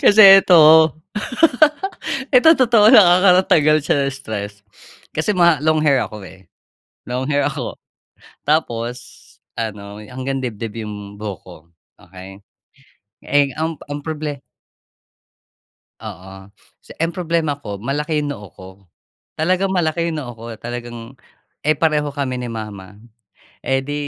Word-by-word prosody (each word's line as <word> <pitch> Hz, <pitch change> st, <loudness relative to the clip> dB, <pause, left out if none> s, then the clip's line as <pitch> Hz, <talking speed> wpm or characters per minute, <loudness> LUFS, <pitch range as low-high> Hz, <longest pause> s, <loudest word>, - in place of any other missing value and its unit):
kasi 200 Hz, -2 st, +8 dB
eto 160 Hz, -4 st, +6 dB, 1.4 s
eto 320 Hz, +6 st, +7 dB
totoo 230 Hz, -3 st, +5 dB
lang, 225 Hz, -6 st, +9 dB
ah 175 Hz, +1 st, +5 dB
,nakakatanggal 180 Hz, -5 st, +4 dB
siya -, -, +2 dB
ng 135 Hz, -, -3 dB
stress. 105 Hz, -6 st, -6 dB, 0.6 s
Kasi 160 Hz, +7 st, 0 dB
ma 170 Hz, -4 st, +4 dB
long 155 Hz, 0 st, +2 dB
hair 140 Hz, -4 st, +3 dB
ako 105 Hz, -2 st, -9 dB
eh, 95 Hz, +1 st, -16 dB, 0.7 s
long 130 Hz, +1 st, -3 dB
hair 145 Hz, -1 st, +1 dB
ako 140 Hz, -, -5 dB, 0.7 s
tapos 125 Hz, -6 st, -1 dB, 0.6 s
ano 105 Hz, -3 st, -6 dB
hanggang 130 Hz, +3 st, -5 dB
dibdib 115 Hz, -2 st, -6 dB
yung 105 Hz, -1 st, -9 dB
buhok 100 Hz, -3 st, -7 dB
ko, -, -, -12 dB, 0.5 s
okey. 95 Hz, +2 st, -13 dB, 0.9 s
Eh, 145 Hz, -1 st, +2 dB
ang 160 Hz, +1 st, -2 dB, 0.2 s
ang 145 Hz, -, -4 dB
proble 150 Hz, -3 st, -5 dB, 1.6 s
Oo. 95 Hz, +2 st, -11 dB, 0.3 s
Si -, -, -16 dB
ang 165 Hz, +1 st, -2 dB
problema 165 Hz, -4 st, -1 dB
ko 100 Hz, -6 st, -6 dB
malaki 145 Hz, +8 st, -3 dB
yung 145 Hz, -1 st, -3 dB
noo 105 Hz, -5 st, -11 dB
ko 95 Hz, -, -11 dB, 0.7 s
talagang 185 Hz, +4 st, 0 dB
malaki 170 Hz, -2 st, -1 dB
noo 140 Hz, -6 st, -6 dB
ko 115 Hz, 0 st, -12 dB
talagang 120 Hz, +1 st, -8 dB, 0.5 s
eh, 155 Hz, 0 st, +1 dB
pareho 150 Hz, -2 st, 0 dB
kami 135 Hz, -3 st, -4 dB
ni 120 Hz, -, -5 dB
mama. 105 Hz, -3 st, -8 dB, 0.6 s
Eh, 135 Hz, 0 st, -1 dB
di 145 Hz, +1 st, -5 dB
140 Hz, 130 wpm, -19 LUFS, 110-160 Hz, 1.6 s, lang